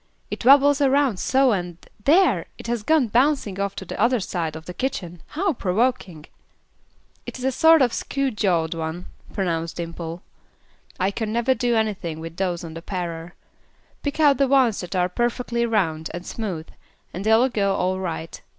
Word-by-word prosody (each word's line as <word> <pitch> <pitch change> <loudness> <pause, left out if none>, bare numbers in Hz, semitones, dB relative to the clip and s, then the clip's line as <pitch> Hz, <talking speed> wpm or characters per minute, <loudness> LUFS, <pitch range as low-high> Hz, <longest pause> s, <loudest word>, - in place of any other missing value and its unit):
"It - - -4
wabbles 285 +3 +6
around 275 -6 +2
so 265 -1 +3
and 175 -4 -2 0.3
there! 360 +7 +4
it - - -11
has 235 -1 -2
gone 300 +2 +3
bouncing 240 -4 +1
off 200 0 -2
to 190 - -6
the - - -5
other 240 +2 +3
side 170 -5 -3
of 160 0 -9
the 180 - -7
kitchen; 175 -9 -4
how 360 +3 -1
provoking!" 195 - -1 1.0
"It - - -6
is 255 - -5
a 265 - +2
sort 320 +2 +6
of 240 - +1
'skew 275 -1 -1
jawed' 175 -7 0
one," 165 +2 -5 0.3
pronounced 165 -4 -2
Dimple. 170 0 -6 0.8
"I 190 +2 +1
can 215 +1 -3
never 235 +3 +2
do 240 -1 0
anything 195 -8 -1
with 165 +1 -8
those 180 -2 -1
on 165 -1 -7
the 165 - -8
parer. 170 -2 -5 0.7
Pick 285 +1 -4
out 290 -4 +5
the 275 - +4
ones 260 -5 +3
that 180 +2 -6
are 180 -1 +2
perfectly 235 +3 -1
round 165 -8 0
and 175 +1 -7
smooth, 185 -8 -4 0.5
and 185 - -5
they 220 +1 +3
will 250 +4 +3
go 200 -4 0
all 185 +1 0
right. 165 -3 -5
205 Hz, 180 wpm, -23 LUFS, 175-255 Hz, 1.0 s, wabbles